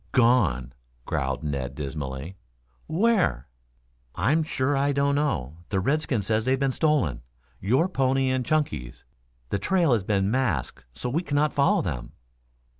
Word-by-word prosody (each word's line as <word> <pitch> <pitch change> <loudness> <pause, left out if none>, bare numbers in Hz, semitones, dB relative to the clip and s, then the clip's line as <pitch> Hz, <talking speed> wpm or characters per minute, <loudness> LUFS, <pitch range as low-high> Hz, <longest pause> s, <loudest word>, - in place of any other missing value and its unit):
"Gone," 95 - +3 0.3
growled 65 -1 -2
Ned 70 -3 -3
dismally. 70 +3 -5 0.5
"Where?" 165 - +1 0.7
"I'm 155 +4 +2
sure 145 -2 0
I 140 +1 +1
don't 140 +1 +2
know. 80 - -1
The 95 - 0
redskin 135 - 0
says 110 +2 +1
they 130 - +3
have 135 - 0
been 135 -1 +1
stolen 140 - +1 0.4
your 130 - +2
pony 135 -5 +1
and 130 -1 0
Chunky's. 125 - -2 0.4
The 100 - -1
trail 170 - +2
has 110 -5 +1
been 100 0 +1
masked 80 - -1
so 70 - -4
we 145 +7 0
cannot 145 -2 0
follow 140 -1 +3
them." 60 -9 -4
125 Hz, 145 wpm, -26 LUFS, -, 0.7 s, Gone